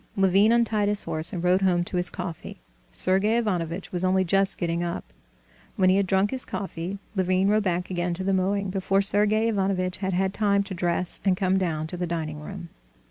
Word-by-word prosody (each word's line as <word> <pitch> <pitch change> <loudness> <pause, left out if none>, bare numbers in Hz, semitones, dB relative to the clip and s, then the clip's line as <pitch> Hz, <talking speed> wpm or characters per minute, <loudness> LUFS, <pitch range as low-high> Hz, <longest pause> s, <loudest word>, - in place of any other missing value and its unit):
Levin 195 +3 +4
untied 220 -3 +2
his 210 0 -1
horse 160 +1 0
and 175 -4 -4
rode 180 +2 +3
home 180 -2 +2
to 180 - -6
his 180 0 +1
coffee. 175 -3 -7 0.3
Sergey 195 +5 +1
Ivanovitch 180 -5 -2
was 180 0 0
only 185 0 +2
just 195 +2 +2
getting 170 -1 -1
up. 170 -1 -3 0.7
When 185 -1 +3
he 190 - +3
had 200 -1 +1
drunk 190 +2 +2
his 260 -1 -3
coffee, 190 -1 -5 0.2
Levin 185 +1 +2
rode 215 +1 +3
back 180 -2 -2
again 175 -1 -1
to 190 - -5
the 195 +1 0
mowing 195 +1 0
before 195 +1 +1
Sergey 210 +2 +3
Ivanovitch 190 -4 0
had 190 -1 -2
had 190 +1 0
time 200 -2 +2
to 195 - -7
dress 175 0 -1
and 190 -2 +2
come 190 0 +1
down 160 -4 -2
to 175 +3 -6
the 175 0 -2
dining 160 -3 -4
room. 175 +2 -8
190 Hz, 205 wpm, -25 LUFS, 175-200 Hz, 0.7 s, Levin